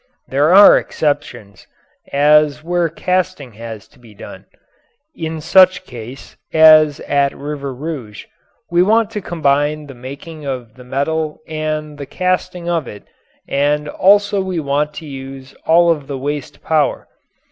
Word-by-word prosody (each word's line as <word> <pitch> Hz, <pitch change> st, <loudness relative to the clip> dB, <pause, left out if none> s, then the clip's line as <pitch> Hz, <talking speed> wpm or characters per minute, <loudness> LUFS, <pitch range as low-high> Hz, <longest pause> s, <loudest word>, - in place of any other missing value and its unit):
There 145 Hz, +4 st, +2 dB
are 200 Hz, +2 st, +8 dB
exceptions, 125 Hz, -10 st, -4 dB, 0.4 s
as 150 Hz, +1 st, +3 dB
where 175 Hz, 0 st, 0 dB
casting 170 Hz, -6 st, -2 dB
has 110 Hz, -1 st, -9 dB
to -, -, -24 dB
be 115 Hz, -4 st, -17 dB
done. -, -, -11 dB, 0.7 s
In 160 Hz, 0 st, -5 dB
such 185 Hz, +3 st, +4 dB
case, 125 Hz, +1 st, -11 dB
as 155 Hz, -2 st, +6 dB
at 140 Hz, -1 st, 0 dB
River 140 Hz, -1 st, -5 dB
Rouge, 130 Hz, -6 st, -7 dB, 0.5 s
we 175 Hz, 0 st, +3 dB
want 220 Hz, +3 st, +2 dB
to 210 Hz, -2 st, -4 dB
combine 150 Hz, -3 st, 0 dB
the 140 Hz, -, -11 dB
making 140 Hz, +5 st, -10 dB
of 125 Hz, -5 st, -5 dB
the 125 Hz, -, -14 dB
metal 150 Hz, +4 st, -2 dB
and 155 Hz, -1 st, -4 dB
the 140 Hz, -, -7 dB
casting 180 Hz, -1 st, -2 dB
of 165 Hz, -6 st, -1 dB
it 105 Hz, -, -10 dB, 0.4 s
and 145 Hz, +1 st, 0 dB
also 205 Hz, +4 st, +3 dB
we 185 Hz, -2 st, -3 dB
want 150 Hz, +1 st, -1 dB
to 160 Hz, -, -8 dB
use 135 Hz, -1 st, -9 dB
all 170 Hz, +1 st, +5 dB
of 150 Hz, -4 st, -3 dB
the 140 Hz, -, -4 dB
waste 145 Hz, 0 st, -5 dB
power. 155 Hz, -2 st, 0 dB
150 Hz, 145 wpm, -17 LUFS, 135-165 Hz, 0.7 s, are